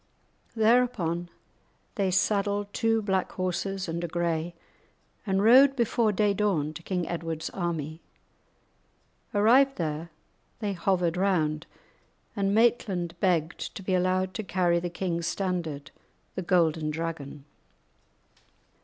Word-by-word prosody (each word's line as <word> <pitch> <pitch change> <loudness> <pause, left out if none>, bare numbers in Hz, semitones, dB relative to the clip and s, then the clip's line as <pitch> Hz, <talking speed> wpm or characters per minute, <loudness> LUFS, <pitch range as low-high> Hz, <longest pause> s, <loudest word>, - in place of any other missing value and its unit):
Thereupon 220 -7 +2 0.6
they 200 -4 0
saddled 205 +2 0
two 225 -2 +1
black 190 -2 -1
horses 185 +1 -2
and 170 +1 -3
a - - -1
grey, 170 0 -2 0.7
and 195 0 +1
rode 265 +5 +7
before 235 -2 +2
day 205 0 +2
dawn 185 -8 0
to 160 - -9
King 180 -1 -2
Edward's 165 -2 -4
army. 165 -3 -3 1.3
Arrived 250 +7 +4
there, 160 0 -3 0.5
they 205 -3 -2
hovered 180 -2 0
round, 165 -5 0 0.7
and 200 -2 0
Maitland 200 -6 +2
begged 175 -4 +1 0.2
to 195 - -7
be 185 - -1
allowed 185 +1 +1
to 220 - -4
carry 175 -2 +1
the 175 +1 -3
king's 170 -1 -2
standard, 170 -7 -3 0.4
the - - -3
Golden 165 -4 +2
Dragon. 150 -3 -5
185 Hz, 120 wpm, -27 LUFS, 165-205 Hz, 1.3 s, rode